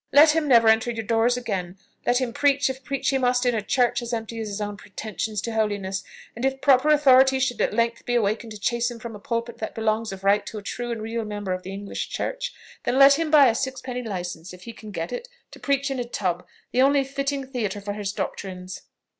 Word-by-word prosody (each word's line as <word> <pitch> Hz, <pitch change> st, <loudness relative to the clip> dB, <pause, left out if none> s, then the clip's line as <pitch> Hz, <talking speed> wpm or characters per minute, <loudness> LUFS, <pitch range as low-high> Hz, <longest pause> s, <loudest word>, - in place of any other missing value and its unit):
Let 300 Hz, +2 st, +8 dB
him 315 Hz, -1 st, 0 dB
never 235 Hz, -4 st, +6 dB
enter 220 Hz, +2 st, +4 dB
your 225 Hz, -2 st, -4 dB
doors 230 Hz, +2 st, +2 dB
again; 195 Hz, -6 st, -4 dB, 0.3 s
let 245 Hz, -, +4 dB
him 250 Hz, -3 st, -2 dB
preach 285 Hz, -1 st, +3 dB
(if 265 Hz, 0 st, -11 dB
preach 275 Hz, +1 st, -1 dB
he 270 Hz, -, +1 dB
must) 250 Hz, 0 st, +2 dB
in 245 Hz, -, +3 dB
a 220 Hz, -, 0 dB
church 245 Hz, +2 st, +1 dB
as 240 Hz, 0 st, -5 dB
empty 225 Hz, 0 st, -4 dB
as 220 Hz, -, -3 dB
his 205 Hz, 0 st, -4 dB
own 205 Hz, -1 st, -3 dB
pretensions 210 Hz, +1 st, -5 dB
to 230 Hz, -, -4 dB
holiness; 205 Hz, -3 st, -1 dB, 0.3 s
and 235 Hz, -, -6 dB
if 270 Hz, 0 st, 0 dB
proper 270 Hz, +1 st, +4 dB
authority 265 Hz, -3 st, +6 dB
should 255 Hz, -3 st, 0 dB
at -, -, +2 dB
length 230 Hz, +1 st, 0 dB
be 245 Hz, -, +1 dB
awaked 225 Hz, 0 st, 0 dB
to 215 Hz, -1 st, -9 dB
chase 235 Hz, +3 st, 0 dB
him 240 Hz, -, -7 dB
from 230 Hz, -1 st, -8 dB
a -, -, -9 dB
pulpit 230 Hz, +2 st, -3 dB
that 220 Hz, -, -5 dB
belongs 220 Hz, 0 st, 0 dB
of 195 Hz, 0 st, -8 dB
right 200 Hz, +1 st, +3 dB
to 220 Hz, -, -6 dB
a 205 Hz, -, -7 dB
true 240 Hz, +3 st, -4 dB
and 225 Hz, -2 st, -4 dB
real 225 Hz, +1 st, -3 dB
member 205 Hz, -3 st, -3 dB
of 185 Hz, -, -4 dB
the 185 Hz, -, -8 dB
English 200 Hz, +1 st, -5 dB
church, -, -, -3 dB, 0.3 s
then 255 Hz, -, 0 dB
let 275 Hz, +2 st, +7 dB
him 325 Hz, -1 st, 0 dB
buy 295 Hz, -3 st, +7 dB
a 230 Hz, -, +3 dB
sixpenny 260 Hz, 0 st, -3 dB
licence, 180 Hz, -6 st, -5 dB
if 180 Hz, -, -16 dB
he 230 Hz, -, -8 dB
can 215 Hz, -1 st, -11 dB
get 170 Hz, 0 st, -4 dB
it, 470 Hz, -, -5 dB, 0.2 s
to -, -, -12 dB
preach 280 Hz, 0 st, 0 dB
in 265 Hz, -, -2 dB
a -, -, 0 dB
tub, 185 Hz, -7 st, -3 dB, 0.2 s
the 255 Hz, -, +2 dB
only 275 Hz, +1 st, +4 dB
fitting 275 Hz, 0 st, -3 dB
theatre 230 Hz, -7 st, -3 dB
for 205 Hz, 0 st, -4 dB
his 205 Hz, -1 st, -3 dB
doctrines." 185 Hz, -2 st, -5 dB
230 Hz, 245 wpm, -24 LUFS, 205-265 Hz, 0.3 s, Let